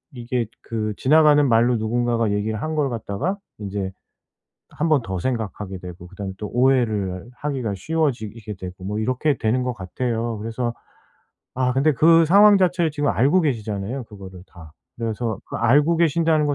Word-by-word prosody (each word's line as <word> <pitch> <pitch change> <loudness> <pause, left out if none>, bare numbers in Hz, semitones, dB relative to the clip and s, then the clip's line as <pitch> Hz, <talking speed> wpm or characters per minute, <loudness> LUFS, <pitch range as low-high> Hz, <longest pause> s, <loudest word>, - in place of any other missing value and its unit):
이게 120 -1 -2
그 110 -2 -3
지나가는 150 0 +5
말로 120 +1 +3
누군가가 115 0 0
얘기를 105 +1 -1
한 155 0 -3
걸 145 -3 +1
갖다가 120 - -3 0.2
인제 100 -2 -4 0.8
1 160 +2 -2
번 145 -5 +4
더 95 -3 -4
생각하게 105 -4 -3
되고 90 -1 -10
그다음에 95 +1 -7
또 105 - -5
오해를 115 -6 +1
하기가 130 -8 -3
쉬워지게 115 - -2
되고 90 0 -9
뭐 105 +3 -3
이렇게 130 +5 0
되는 125 +3 0
것 125 -1 -2
같아요. 115 +3 -3
그래서 115 +2 -3 0.8
아 125 0 +1
근데 145 +3 +3
그 165 +5 +5
상황 200 +3 +7
자체를 175 -3 +2
지금 145 -1 0
알고 145 +10 +3
계시잖아요, 115 -2 -2
그거를 95 -4 -11
다. 80 -4 -14 0.3
그래서 115 -2 -2
그 - - -10
알고 145 +8 +3
계신다는 160 -2 +2
거 145 - 0
120 Hz, 340 characters per minute, -22 LUFS, 105-145 Hz, 0.8 s, 상황